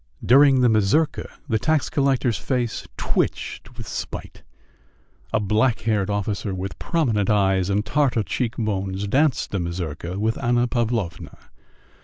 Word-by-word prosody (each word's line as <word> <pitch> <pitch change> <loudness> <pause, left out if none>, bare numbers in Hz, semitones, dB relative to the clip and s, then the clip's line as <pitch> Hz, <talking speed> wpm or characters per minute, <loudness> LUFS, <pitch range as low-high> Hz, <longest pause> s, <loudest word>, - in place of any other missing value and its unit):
During 135 +1 +6
the 125 - +5
mazurka 110 +8 +2 0.2
the 110 -5 +1
tax 155 +1 +1
collector's 135 -4 +1
face 125 -4 -2
twitched 120 +3 -2
with 115 -3 -8
spite. - - -6 0.9
A - - +2
black 110 +4 +1
haired 105 -3 0
officer 100 -1 -2
with 95 +1 -5
prominent 115 - 0
eyes 95 -3 +2
and 105 +2 0
Tartar 130 -2 +1
cheekbones 100 -3 -2
danced 140 +5 +1
the 100 - -1
mazurka 85 0 -4
with 110 +2 -1
Anna 120 0 +2
Pavlovna. 115 -8 -2
110 Hz, 130 wpm, -23 LUFS, 100-125 Hz, 0.9 s, During